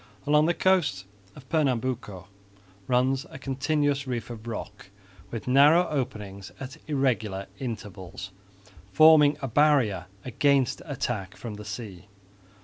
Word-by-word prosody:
Along 150 +1 +4
the 170 - +1
coast 150 - +1 0.3
of 130 -3 -14
Pernambuco 125 - -1 0.6
runs 130 +4 +1
a - - -9
continuous 140 +1 -1
reef 120 -1 -4
of 115 -1 -9
rock 105 -3 -7 0.4
with 115 0 -6
narrow 145 +7 +6
openings 105 -9 -4
at 130 0 -8
irregular 115 -9 0
intervals, 100 -6 -7 0.6
forming 155 +3 +6
a - - 0
barrier 125 - +3 0.2
against 135 +2 +1
attack 120 -9 -4
from 115 -3 -7
the 105 0 -9
sea. 105 -3 -8
130 Hz, 120 wpm, -26 LUFS, 105-145 Hz, 0.6 s, narrow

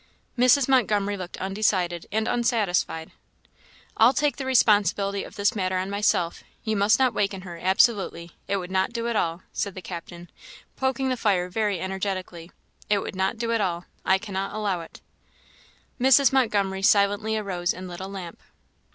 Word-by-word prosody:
Mrs. 255 +2 +4
Montgomery 210 -6 +2
looked 185 -2 -7
undecided 190 -3 -1
and 220 +1 0
unsatisfied. 205 -9 0 0.8
"I'll 230 +4 +5
take 295 0 +1
the 270 -2 -4
responsibility 205 -5 +3
of - - -11
this 205 +1 +1
matter 185 -2 -1
on 190 +2 -3
myself; 200 -4 0 0.2
you 220 -1 -1
must 205 +1 +4
not 260 -2 +2
waken 195 -2 -1
her, 175 -2 -9
absolutely. 190 -3 +1 0.2
It 200 - 0
would 180 -1 -6
not 190 +4 0
do 235 -1 -2
at 235 - -1
all," 170 -2 -1
said 200 -2 -3
the 185 - -7
captain, 170 0 -9 0.4
poking 265 0 -1
the 255 - -1
fire 185 -6 +1
very 205 -1 -1
energetically; 190 -2 -4 0.4
"it 205 - +4
would - - -6
not 190 +3 0
do 230 +1 -2
at 230 -2 +1
all; 175 -2 -2 0.2
I 190 - +3
cannot 195 -1 -4
allow 200 -5 -1
it." 165 - -13 1.0
Mrs. 265 +2 +5
Montgomery 200 -7 +1
silently 205 +2 +3
arose 180 -4 -1
and 185 +1 -7
lit 175 -1 -8
a 190 - -5
lamp. 190 -4 -8
200 Hz, 170 wpm, -25 LUFS, 185-220 Hz, 1.0 s, I'll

